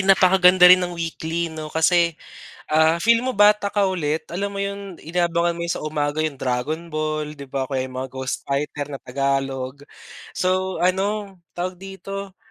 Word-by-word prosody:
napakaganda 185 -1 +5
rin 180 +1 +9
ng 175 -1 -3
weekly, 165 0 -3
'no? 155 -1 -6
Kasi, 170 +1 +2 0.5
ah, 160 +2 +3
feel 230 +4 +4
mo 260 - 0
bata 205 -1 +4
ka 200 -2 +2
ulit, 160 -4 -2
alam 200 +3 -3
mo 200 - -4
'yon, 200 -2 -5
inaabangan 170 0 0
mo 170 - -3
'yon 170 - -1
sa - - -4
umaga 150 0 -2
'yong 155 -3 -1
Dragon 145 +7 -3
Ball, 155 -1 -2
'di 140 -2 -11
ba, 135 0 -2
o 130 - -11
kaya 130 -1 -1
mga 130 0 -6
Ghost 130 0 -4
Fighter 145 +1 -3
na 140 - -6
Tagalog. 135 0 -2 0.6
So, 185 0 0
ano 195 0 -1 0.2
tawag 180 +1 -4
dito? 195 0 -7
170 Hz, 175 wpm, -22 LUFS, 150-190 Hz, 0.6 s, rin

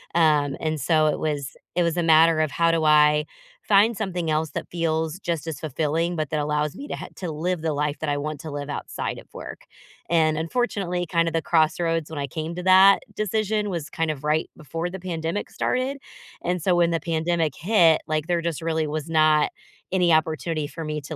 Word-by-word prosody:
Um, 150 -4 +3
and 155 -3 -2
so 155 +2 +3
it 150 - 0
was 145 -3 -3 0.2
it 175 - +3
was 170 -1 0
a 175 - +1
matter 165 0 +5
of 155 -2 +2
how 165 +2 +2
do 165 -1 +1
I 150 0 +5 0.4
find 210 +3 +4
something 180 -6 -2
else 155 0 0
that - - -4
feels 160 0 -1
just 170 -5 -3
as 160 -4 -5
fulfilling, 160 +3 -1
but 155 -3 -3
that 155 - 0
allows 150 0 -1
me 285 - -8
to - - -4
ha - - -7
to 180 -3 -4
live 170 +2 -2
the 160 - -1
life 150 0 -2
that 155 - -2
I 145 - 0
want 150 0 -4
to 155 - -7
live 145 0 -5
outside 145 - -4
of - - -15
work. - - -9 0.5
And, 155 -2 +2
unfortunately, 180 -1 -1
kinda 165 -1 +1
the 165 0 -1
crossroads 165 0 +1
when 160 - -7
I 140 - -1
came 160 +5 -5
to 180 - -5
that 190 +1 +6
decision 215 0 -1
was 170 -2 -4
kind 165 -1 -1
of 150 -2 -4
right 155 +1 0
before 165 +3 -4
the 190 +1 -7
pandemic 170 +1 -3
started. 265 +2 -1 0.4
And 180 -1 -1
so 185 -2 +3
when 170 -1 +3
the 165 -1 0
pandemic 165 -2 0
hit, 170 -4 +4
like, 155 -1 -1
there 175 -1 0
just 165 -3 -2
really 160 -1 0
was 155 0 -4
not 155 -1 +3 0.4
any 180 -3 +3
opportunity 155 0 0
for 165 +2 -7
me 150 -1 -3
to 150 +3 -7
160 Hz, 215 wpm, -24 LUFS, 155-175 Hz, 0.5 s, that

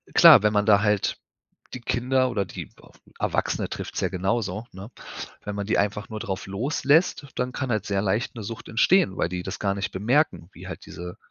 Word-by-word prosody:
klar, - - +9
wenn 105 0 +3
man 105 -1 +2
da 105 -2 +5
halt 105 -2 +1 0.6
die 130 - -6
Kinder 130 +2 +1
oder 105 -5 -1
die 90 - -7
E - - -18 0.5
Erwachsene - - -1
trifft's - - -5
ja - - +1
genauso, 95 +2 -2
ne? 95 +5 -10 0.5
Wenn 105 - -4
man 100 0 -3
die 110 - +1
einfach 105 +1 -1
nur 110 - -5
drauf 95 -3 -4
loslässt, 140 - +1
dann 125 0 -1
kann 130 0 -3
halt 110 -3 -1
sehr 100 -1 0
leicht 105 +6 -1
'ne 115 - -7
Sucht 110 +2 -7
entstehen, 115 - +3
weil - - 0
die 90 0 -4
das 95 - -5
gar 100 -1 0
nicht 100 - -3
bemerken, 110 - +1
wie - - -11
halt - - -8
diese 90 0 -8
105 Hz, 205 wpm, -25 LUFS, 95-120 Hz, 0.6 s, klar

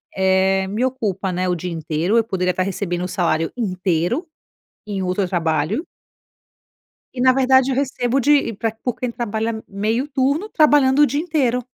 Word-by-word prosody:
eh, 190 0 +2
me 210 +5 -2
ocupa, 205 -7 -2
né, 185 +1 -1
o 180 - +1
dia 175 +1 -5
inteiro, 165 +5 -1
eu 230 - +4
poderia 185 -4 -1
estar 185 - -1
recebendo 180 -2 -3
o - - -2
salário 165 -3 0
inteiro, 185 - -1 0.6
em 195 -2 -3
outro 185 +1 -1
trabalho 165 - -1 1.3
e 255 - -10
na 255 - +7
verdade 260 0 +4
eu - - 0
recebo 250 -2 -2
de 295 - +6
e 280 -5 +2
pra 225 - -1
por 225 +2 -4
quem 250 - -3
trabalha 225 -1 -3
meio 220 +7 -1
turno, 280 +8 0
trabalhando 290 -6 +4
o 295 - +7
dia 285 +3 -1
inteiro. 265 -8 0
215 Hz, 175 wpm, -20 LUFS, 185-260 Hz, 1.3 s, na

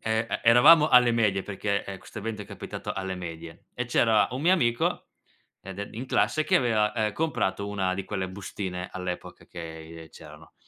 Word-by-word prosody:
Ehm, 110 +1 -1
e - - -2
eravamo 150 +7 +7
alle 125 -3 +6
medie, 105 -5 +1
perché, 100 0 -2
ehm, 100 -1 -7
questo 110 - -10
evento 110 0 -5
è - - -11
capitato - - -6
alle 95 -1 -4
medie, 85 -2 -9
e 125 - -2
c'era 115 -3 +3
un 130 +2 -4
mio 175 +3 +4
amico 120 -10 +1 0.6
ed 95 0 -9
e 100 - -5
in 120 +4 -6
classe 155 - +1
che 155 - +2
aveva, 110 -4 +2
ehm, 110 -3 -1
comprato 100 -10 -1
una 95 -2 -1
di 95 +1 -4
quelle 95 -1 -4
bustine 95 -1 -6
all'epoca 90 -1 -6
che 80 -1 -9
c'erano - - -14
100 Hz, 185 wpm, -26 LUFS, 95-120 Hz, 0.6 s, eravamo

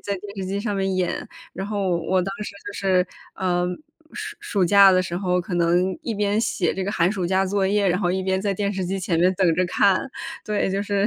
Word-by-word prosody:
在 200 - -4
电 200 +2 -10
视 190 - -2
机 195 +2 -2
上 210 -1 -2
面 195 -1 0
演。 180 -1 -1 0.3
然 190 - -5
后 200 -3 -1
我 185 +3 +1
当 195 +2 -3
时 - - -5 0.2
就 205 - -5
是， 185 -2 +1 0.3
嗯， 180 +1 -1 0.3
暑 425 -1 -6
暑 200 -4 0
假 200 +2 +7
的 185 -1 +4
时 175 -1 -4
候 180 -1 +1
可 175 +1 -5
能 175 +2 +2
一 235 - -2
边 205 +1 +1
写 215 -5 0
这 190 - -2
个 200 - -2
寒 180 -3 +2
暑 190 -4 -2
假 190 +2 +2
作 195 +1 0
业， 200 0 +2
然 180 - +1
后 175 -3 +1
一 190 +1 -1
边 190 0 0
在 200 -1 0
电 200 +1 -1
视 190 -2 -2
机 190 +2 -2
前 185 -2 -1
面 180 +2 +4
等 180 -3 +3
着 185 - +2
看， 195 +8 +2 0.3
对， 210 -2 0
就 195 +1 -1
是。 200 0 +1
190 Hz, 265 characters per minute, -23 LUFS, 180-200 Hz, 0.3 s, 假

